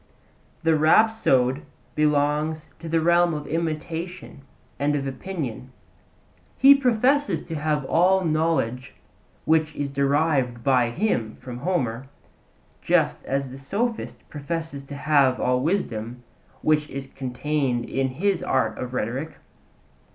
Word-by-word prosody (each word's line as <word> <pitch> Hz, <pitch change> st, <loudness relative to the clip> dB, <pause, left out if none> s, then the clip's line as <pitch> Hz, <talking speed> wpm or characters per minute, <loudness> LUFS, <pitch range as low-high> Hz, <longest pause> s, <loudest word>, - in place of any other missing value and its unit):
The 165 Hz, -1 st, +4 dB
rhapsode 155 Hz, -, +3 dB, 0.3 s
belongs 150 Hz, +1 st, +1 dB
to 165 Hz, -, -7 dB
the 165 Hz, 0 st, +2 dB
realm 170 Hz, 0 st, +3 dB
of 150 Hz, -1 st, -5 dB
imitation 165 Hz, +1 st, -4 dB, 0.4 s
and 145 Hz, +1 st, +1 dB
of 140 Hz, -1 st, -2 dB
opinion: 135 Hz, -4 st, -5 dB, 0.9 s
he 275 Hz, +1 st, +9 dB
professes 255 Hz, -, +2 dB
to 165 Hz, -, -8 dB
have 150 Hz, -2 st, -1 dB
all 185 Hz, +5 st, +3 dB
knowledge, 155 Hz, -6 st, 0 dB, 0.5 s
which 155 Hz, -1 st, +2 dB
is 145 Hz, -1 st, -3 dB
derived 140 Hz, -3 st, +1 dB
by 125 Hz, -3 st, +3 dB
him 120 Hz, -, -1 dB
from 125 Hz, -1 st, -9 dB
Homer, 130 Hz, -8 st, -2 dB, 0.7 s
just -, -, +1 dB
as 135 Hz, -1 st, -2 dB
the 135 Hz, -, -9 dB
sophist 220 Hz, -, -3 dB
professes 155 Hz, -1 st, -5 dB
to 140 Hz, -, -8 dB
have 140 Hz, -3 st, +3 dB
all 125 Hz, 0 st, +1 dB
wisdom, 125 Hz, -, -2 dB, 0.4 s
which 150 Hz, -1 st, +2 dB
is 135 Hz, 0 st, -6 dB
contained 135 Hz, -1 st, -2 dB
in 135 Hz, 0 st, 0 dB
his 180 Hz, +8 st, -1 dB
art -, -, 0 dB
of 125 Hz, 0 st, -5 dB
rhetoric. 130 Hz, +8 st, -3 dB
150 Hz, 120 wpm, -24 LUFS, 130-165 Hz, 0.9 s, he